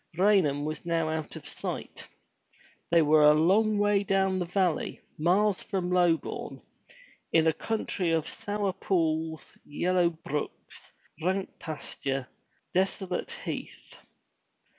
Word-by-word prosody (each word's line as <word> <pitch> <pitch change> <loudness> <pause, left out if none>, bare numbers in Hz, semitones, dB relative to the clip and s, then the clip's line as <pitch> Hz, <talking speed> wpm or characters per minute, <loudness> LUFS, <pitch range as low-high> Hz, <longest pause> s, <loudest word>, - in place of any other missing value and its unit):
Raynham 180 -8 +3
was 155 0 -4
now 165 -2 0
out 160 -1 -3
of - - -9
sight. - - -6 0.8
They 170 -1 +5
were 155 +1 +5
a 150 0 +7
long 205 +7 +3
way 205 -1 +3
down 195 -2 +1
the 180 - -1
valley, 180 -2 0 0.2
miles 190 +5 +3
from 180 -2 -2
Lobourne, 175 -3 +1 0.7
in 165 -1 +4
a 160 - +4
country 195 -2 -1
of 165 -2 +1
sour 205 -2 -2
pools, 160 -4 -1
yellow 175 +3 +1
brooks, 155 -3 -6 0.3
rank 190 +3 0
pasturage, 135 -4 -4 0.5
desolate 190 - -1
heath. - - -6
175 Hz, 120 wpm, -28 LUFS, 160-195 Hz, 0.8 s, a